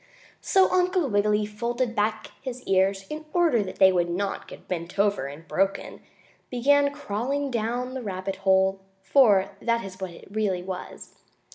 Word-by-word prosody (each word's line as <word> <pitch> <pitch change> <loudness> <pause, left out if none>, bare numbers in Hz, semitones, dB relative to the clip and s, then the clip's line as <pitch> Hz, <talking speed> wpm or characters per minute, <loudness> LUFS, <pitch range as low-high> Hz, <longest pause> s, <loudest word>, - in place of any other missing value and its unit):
So 380 -1 +4
Uncle 365 -3 +2
Wiggily, 210 0 +2
folding 235 +3 -2
back 215 0 -1
his 255 -1 -6
ears 195 0 +1
in 310 +1 -6
order 330 -10 +3
that 190 -2 -5
they 190 0 +6
would 175 -2 +1
not 195 +3 -3
get - - -12
bent 170 0 -5
over 200 -8 +1
and 150 +4 -10
broken, 195 +6 -1 0.5
began 280 +3 +3
crawling 280 +1 -3
down 240 +2 -2
the 260 - -4
rabbit 190 -2 -4
hole, 190 0 +3 0.2
for 200 -4 +4
that 235 -2 0
is 190 0 -10
what 190 - -3
it 170 - -13
really 200 -4 -1
was. 185 0 -8
210 Hz, 160 wpm, -26 LUFS, 190-250 Hz, 0.5 s, they